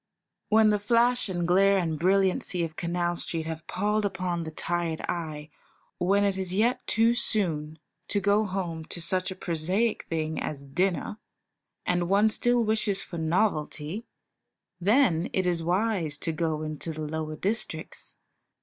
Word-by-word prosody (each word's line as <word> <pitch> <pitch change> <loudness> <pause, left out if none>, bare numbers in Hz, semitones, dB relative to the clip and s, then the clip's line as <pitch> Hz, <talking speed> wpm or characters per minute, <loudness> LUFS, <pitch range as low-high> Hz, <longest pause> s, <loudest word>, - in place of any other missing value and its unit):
When 220 0 +5
the 210 - +1
flash 235 +2 +2
and 175 -2 -1
glare 195 +2 +5
and 165 -4 -1
brilliancy 185 0 +2
of 160 -1 -4
Canal 175 +1 -1
Street 165 -1 -1
have 160 0 -6
palled 210 +2 0
upon 180 -4 -2
the - - -4
tired 170 0 -2
eye, 155 -3 -4 0.5
when 195 +3 +3
it 195 -1 +1
is 185 -1 -2
yet 235 +5 +1
too 225 +2 +4
soon 160 -10 -1 0.3
to 205 - 0
go 205 +2 +3
home 180 -5 -3
to 170 - -7
such 185 +2 -1
a 190 - -5
prosaic 185 +6 0
thing 160 -1 -2
as 140 -2 -4
dinner, 180 +8 -1 0.7
and 175 -1 0
one 205 +3 +4
still 240 +1 +2
wishes 215 -2 +2
for 170 - -7
novelty, 160 +2 -1 0.7
then 195 - +3
it 185 - +1
is 175 -2 +1
wise 175 -3 0
to 165 - -2
go 155 -1 -1
into 155 +1 -4
the 155 - -6
lower 155 0 -4
districts. 205 +8 -3
180 Hz, 155 wpm, -27 LUFS, 160-205 Hz, 0.7 s, When